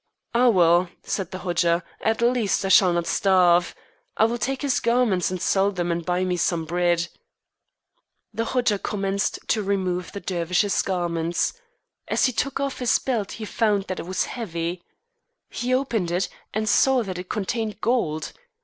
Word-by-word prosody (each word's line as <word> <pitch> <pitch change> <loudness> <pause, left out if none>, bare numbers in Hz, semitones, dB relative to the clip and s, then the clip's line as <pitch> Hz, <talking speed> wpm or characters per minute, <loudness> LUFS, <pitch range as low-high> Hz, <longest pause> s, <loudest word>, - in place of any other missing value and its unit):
"Ah, 245 +1 +5
well," 175 -3 +4
said 190 -4 -3
the 185 - -6
Hodja, 175 -2 +1 0.2
"at 220 +1 0
least 235 -5 +1
I - - -1
shall 185 -1 +6
not 170 -1 0
starve. 180 -3 +3 0.4
I - - +5
will 235 +1 -1
take 270 +5 -2
his 275 -3 +1
garments 235 -7 +2
and 185 0 -4
sell 195 +3 +2
them 175 -3 -2
and 170 0 -2
buy 180 +1 0
me 180 -1 -1
some 170 -1 0
bread." 175 0 +1 1.3
The 230 - -2
Hodja 240 -5 +1
commenced 195 -1 -1
to 220 - +2
remove 185 -3 -1
the 200 - -6
Dervish's 180 +2 0
garments. 170 -2 -1 0.5
As - - +2
he 255 - +2
took 275 +3 -2
off 275 -1 -2
his 245 -2 +3
belt 230 -7 -2
he 220 - -6
found 210 -2 +1
that 185 -1 -5
it - - -6
was 185 - 0
heavy. 175 -6 -4 0.7
He 245 +1 -3
opened 240 -8 0
it, 180 +2 -1 0.2
and 215 +1 -2
saw 260 +3 +4
that 185 -3 -5
it 180 - -8
contained 215 +1 -2
gold. 160 -11 -1
195 Hz, 170 wpm, -24 LUFS, 175-230 Hz, 1.3 s, shall